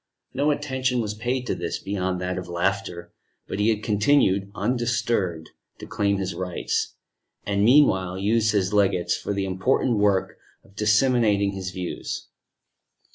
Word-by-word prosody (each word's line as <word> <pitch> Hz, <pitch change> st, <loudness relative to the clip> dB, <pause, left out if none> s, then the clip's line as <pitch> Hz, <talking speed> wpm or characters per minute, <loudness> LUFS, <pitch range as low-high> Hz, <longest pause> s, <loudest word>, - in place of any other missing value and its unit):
No 145 Hz, +2 st, +1 dB
attention 130 Hz, -4 st, 0 dB
was 105 Hz, -2 st, -2 dB
paid 125 Hz, +4 st, -2 dB
to -, -, -1 dB
this, -, -, -3 dB
beyond 95 Hz, -2 st, -2 dB
that 90 Hz, 0 st, -2 dB
of 90 Hz, -, -8 dB
laughter; 90 Hz, 0 st, -2 dB, 0.3 s
but -, -, -4 dB
he 105 Hz, +2 st, +3 dB
had 110 Hz, -1 st, 0 dB
continued, 105 Hz, -3 st, +2 dB
undisturbed, 115 Hz, -7 st, -1 dB, 0.3 s
to -, -, -9 dB
claim 100 Hz, 0 st, 0 dB
his 95 Hz, -1 st, -3 dB
rights, 90 Hz, 0 st, -2 dB, 0.5 s
and, 100 Hz, 0 st, +1 dB
meanwhile, 95 Hz, -8 st, +4 dB
used 110 Hz, +3 st, +2 dB
his 100 Hz, -2 st, 0 dB
legates 95 Hz, -4 st, +2 dB
for -, -, -4 dB
the 100 Hz, -1 st, -1 dB
important 105 Hz, +5 st, +1 dB
work 100 Hz, -2 st, +1 dB, 0.2 s
of 95 Hz, -, -23 dB
disseminating 105 Hz, -2 st, +3 dB
his 95 Hz, -1 st, -5 dB
views. 90 Hz, -1 st, -5 dB
100 Hz, 145 wpm, -24 LUFS, 95-115 Hz, 0.5 s, meanwhile